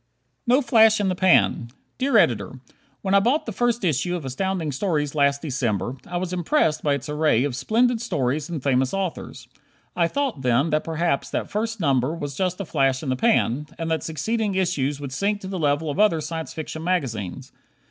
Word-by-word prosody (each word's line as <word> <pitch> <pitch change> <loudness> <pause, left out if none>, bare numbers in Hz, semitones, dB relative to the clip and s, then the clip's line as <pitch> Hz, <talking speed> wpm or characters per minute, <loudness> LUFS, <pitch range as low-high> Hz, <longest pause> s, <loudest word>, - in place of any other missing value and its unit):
No 255 +4 +4
"Flash 225 -2 +5
in 200 -2 +1
the 185 - 0
Pan" 180 -9 +3 0.3
Dear 265 -2 +3
Editor: 120 - +1 0.4
When 190 - 0
I 200 - +7
bought 245 +10 +1
the 225 - -4
first 240 +1 0
issue 175 +2 0
of 165 -5 -5
Astounding 165 +4 -2
Stories 150 -1 -1
last 140 -1 +2
December, 125 - -1
I 175 - -3
was 180 0 -3
impressed 175 - +1
by 145 -2 +1
its 140 - -6
array 150 -5 +2
of 140 -3 -2
splendid 230 - +1
stories 145 - -1
and 160 -6 -5
famous 130 +2 +1
authors. 190 -3 -4 0.5
I 170 -1 +2
thought, 270 - -2
then, 125 +5 +2
that 155 0 +1
perhaps 165 -2 -1
that - - -3
first 225 +1 -2
number 140 -2 +1
was 145 -3 -5
just 185 +1 -1
a 200 - -3
flash 135 -4 +1
in 140 - -3
the 130 - +1
pan, 150 - +1
and 165 -1 -3
that 160 -2 0
succeeding 200 - -2
issues 150 -7 0
would 140 -2 -6
sink 200 +9 -1
to 190 - -7
the 190 -1 -4
level 145 0 +1
of 160 - -5
other 210 -6 +4
Science 160 +1 -5
Fiction 160 0 -6
magazines. 130 - -2
160 Hz, 200 wpm, -23 LUFS, 140-195 Hz, 0.5 s, I